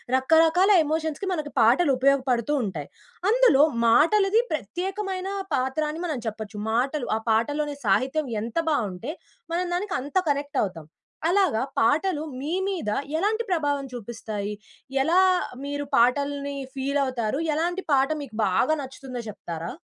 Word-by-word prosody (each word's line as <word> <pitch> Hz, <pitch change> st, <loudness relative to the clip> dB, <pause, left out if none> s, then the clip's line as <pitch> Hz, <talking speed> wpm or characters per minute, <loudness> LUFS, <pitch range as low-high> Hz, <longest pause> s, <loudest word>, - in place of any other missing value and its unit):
రకరకాల 325 Hz, +8 st, +4 dB
ఎమోషన్స్‌కి 315 Hz, +4 st, -2 dB
మనకి 305 Hz, -5 st, -3 dB
పాటలు 260 Hz, +8 st, +5 dB
ఉపయోగపడుతూ 265 Hz, -1 st, +2 dB
ఉంటాయి. 165 Hz, -9 st, -4 dB, 0.4 s
అందులో 460 Hz, -, +5 dB, 0.2 s
మాటలది 390 Hz, -, +4 dB
ప్రత్యేకమైన 370 Hz, -, -3 dB, 0.3 s
పాత్ర 265 Hz, +4 st, -1 dB
అని 310 Hz, +2 st, -5 dB
మనం 310 Hz, -5 st, -2 dB
చెప్పొచ్చు. 220 Hz, -1 st, -5 dB
మాటలు 255 Hz, +4 st, 0 dB
ఆ -, -, +1 dB
పాటలోని 290 Hz, +7 st, +1 dB
సాహిత్యం 260 Hz, -, +3 dB, 0.3 s
ఎంత 230 Hz, +5 st, -5 dB
బావుంటే 225 Hz, -, -2 dB, 0.4 s
మనం 355 Hz, +2 st, 0 dB
దానికి 380 Hz, +2 st, -2 dB
అంత 280 Hz, +5 st, -8 dB
కనెక్ట్ 285 Hz, 0 st, -1 dB
అవుతాం. 175 Hz, -6 st, -5 dB, 0.4 s
అలాగా 360 Hz, -, +2 dB, 0.2 s
పాటలు 300 Hz, +7 st, +2 dB, 0.2 s
మీ 300 Hz, +4 st, -3 dB
మీద 365 Hz, -, -2 dB, 0.3 s
ఎలాంటి 430 Hz, +6 st, 0 dB
ప్రభావం 290 Hz, -5 st, 0 dB
చూపిస్తాయి? 215 Hz, -3 st, -5 dB, 0.5 s
ఎలా 335 Hz, +7 st, +3 dB, 0.5 s
మీరు 285 Hz, 0 st, -3 dB
పాటల్ని 280 Hz, +3 st, +1 dB, 0.2 s
ఫీల్ 275 Hz, +2 st, -1 dB
అవుతారు? 255 Hz, 0 st, -2 dB, 0.2 s
ఎలాంటి 350 Hz, +4 st, -1 dB
పాట 270 Hz, 0 st, +3 dB
మీకు 240 Hz, -6 st, -11 dB
బాగా 195 Hz, +11 st, +2 dB
నచ్చుతుందో 265 Hz, -2 st, -7 dB
చెప్తారా? 170 Hz, -4 st, -6 dB
285 Hz, 125 wpm, -25 LUFS, 235-325 Hz, 0.5 s, పాటలు